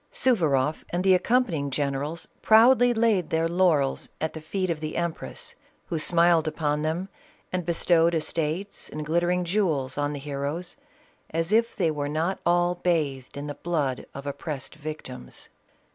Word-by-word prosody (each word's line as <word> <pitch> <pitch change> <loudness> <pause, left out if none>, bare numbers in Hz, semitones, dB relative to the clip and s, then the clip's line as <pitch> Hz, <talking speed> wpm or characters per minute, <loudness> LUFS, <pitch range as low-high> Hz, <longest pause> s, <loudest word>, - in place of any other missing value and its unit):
Suvaroff 155 - +2
and 175 +1 -1
the 190 -1 +5
accompanying 185 - +1
generals 140 +3 -2
proudly 245 +3 +6
laid 220 -7 +2
their 160 0 +1
lau 175 0 +4
rels 135 -2 -2
at 160 - -2
the 160 - -7
feet 185 +3 -2
of 160 - -3
the 155 0 -4
empress, 170 -1 -3 0.4
who 165 - -1
smiled 170 0 +4
upon 150 -1 -1
them 160 +5 -1 0.5
and 180 -2 -2
bestowed 170 0 +3
estates 160 +4 -2
and 150 0 -5
glittering 175 +3 +1
jewels 160 -8 0
on 145 0 0
the 145 - -5
he 145 +1 -7
roes, 145 +6 -3 0.5
as 165 +3 -1
if 230 +2 +3
they 170 -5 +1
were 145 -1 -3
not 165 +5 -1
all 175 0 +3
bathed 150 -8 -1
in 145 - -4
the 145 - -4
blood 145 -5 -2
of 140 +1 -7
op 140 - -5
pressed 145 -5 -5
victims. 150 - -8
165 Hz, 165 wpm, -26 LUFS, 145-180 Hz, 0.5 s, proudly